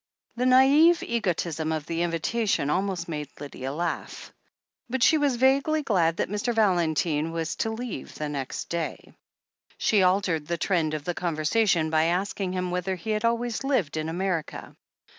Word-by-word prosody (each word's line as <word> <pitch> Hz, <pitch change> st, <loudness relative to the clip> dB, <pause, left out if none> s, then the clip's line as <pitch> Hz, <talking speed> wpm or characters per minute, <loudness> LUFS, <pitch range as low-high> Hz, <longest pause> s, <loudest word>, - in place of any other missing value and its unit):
The 250 Hz, +2 st, 0 dB
naive 280 Hz, +7 st, +6 dB
egotism 170 Hz, -8 st, -1 dB
of 155 Hz, -2 st, -2 dB
the 165 Hz, +1 st, -2 dB
invitation 175 Hz, -1 st, 0 dB
almost 185 Hz, 0 st, -1 dB
made 150 Hz, -3 st, -5 dB
Lydia 135 Hz, -2 st, -6 dB
laugh. 170 Hz, +3 st, -4 dB, 0.6 s
But 255 Hz, 0 st, 0 dB
she 315 Hz, -, +5 dB
was 285 Hz, -3 st, +2 dB
vaguely 275 Hz, +5 st, +2 dB
glad 170 Hz, -9 st, +2 dB
that -, -, 0 dB
Mr. 210 Hz, +4 st, -2 dB
Valentine 165 Hz, -6 st, +1 dB
was 165 Hz, -1 st, -3 dB
to 225 Hz, -, -1 dB
leave 220 Hz, -, -6 dB
next 145 Hz, -3 st, -4 dB
day. 170 Hz, -2 st, -4 dB, 0.6 s
She 210 Hz, -3 st, +3 dB
altered 180 Hz, -5 st, +1 dB
the 170 Hz, -, -1 dB
trend 160 Hz, -4 st, 0 dB
of 150 Hz, -, -5 dB
the 175 Hz, -, -2 dB
conversation 170 Hz, +1 st, +1 dB
by 160 Hz, 0 st, +3 dB
asking 185 Hz, +2 st, -1 dB
him 180 Hz, -1 st, -2 dB
whether 180 Hz, +1 st, -1 dB
he 185 Hz, +5 st, -5 dB
had 215 Hz, +1 st, -1 dB
always 235 Hz, +1 st, 0 dB
lived 260 Hz, -, 0 dB
in 155 Hz, 0 st, -2 dB
America. 175 Hz, -2 st, -3 dB
180 Hz, 160 wpm, -26 LUFS, 160-225 Hz, 0.6 s, naive